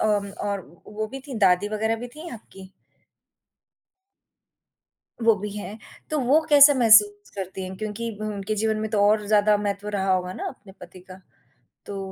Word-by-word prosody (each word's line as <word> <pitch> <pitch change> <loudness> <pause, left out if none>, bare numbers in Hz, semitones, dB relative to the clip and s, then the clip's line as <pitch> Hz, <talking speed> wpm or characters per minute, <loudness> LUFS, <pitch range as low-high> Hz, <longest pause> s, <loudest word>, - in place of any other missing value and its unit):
अ, - - +1 0.4
और 200 -1 -2 0.3
वो 215 +1 -4
भी 270 +4 -8
थीं 265 -5 -6
दादी 190 0 +3
वग़ैरह 220 +1 -1
भी 245 +2 -8
थीं 330 +2 -9
आपकी? 195 -4 -13 2.5
वो 225 0 +5
भी 210 +1 -6
हैं, 210 +1 -7 0.3
तो 305 - 0
वो 270 +5 +3
कैसा 290 0 +8
महसूस 210 -4 +4
करती 190 -1 -6
हैं, 185 0 -8
क्योंकि 215 +3 -5
उनके 210 -1 -3
जीवन 220 +1 0
में 220 0 -4
तो 210 -2 +1
और 210 0 +1
ज़्यादा 210 0 +3
महत्व 205 0 -4
रहा 195 -2 0
होगा 185 0 -1
ना - - -6
अपने 195 - -13
पति 185 - -12
का, 185 +1 -14 0.7
तो 200 -1 -6
210 Hz, 170 wpm, -24 LUFS, 195-225 Hz, 2.5 s, कैसा